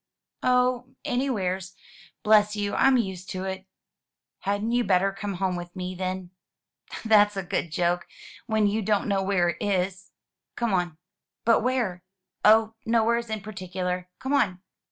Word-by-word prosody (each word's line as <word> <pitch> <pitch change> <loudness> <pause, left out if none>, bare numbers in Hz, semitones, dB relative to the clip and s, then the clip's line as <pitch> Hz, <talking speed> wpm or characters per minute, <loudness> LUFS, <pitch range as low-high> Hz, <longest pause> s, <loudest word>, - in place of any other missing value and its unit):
"Oh, 250 0 +1
anywheres. 190 -8 -1 0.5
Bless 210 -1 +5
you, 205 -1 -2
I'm 265 -1 +4
used 190 -5 -3
to 185 0 -4
it." 190 0 -5 0.7
"Hadn't 205 +3 -1
you 245 0 +2
better 195 -1 +3
come 200 0 -5
home 185 0 -1
with 175 +1 -7
me, 185 0 -4
then?" 185 0 -4 0.7
"That's 210 -2 +5
a 195 - -1
good 175 -1 -2
joke, 175 +2 0 0.4
when 220 -2 +2
you 210 +2 +1
don't 210 0 +1
know 200 -2 +1
where 190 -3 +2
it 165 - -3
is. 190 -1 -1 0.4
Come 235 -4 0
on." 175 -3 0 0.5
"But 230 0 +5
where?" 235 -7 0 0.4
"Oh, 220 +1 +5
nowheres 235 +1 +1
in 220 -1 -3
particular. 185 -3 -4
Come 265 +2 -3
on." 190 -10 +1
195 Hz, 150 wpm, -26 LUFS, 185-220 Hz, 0.7 s, Bless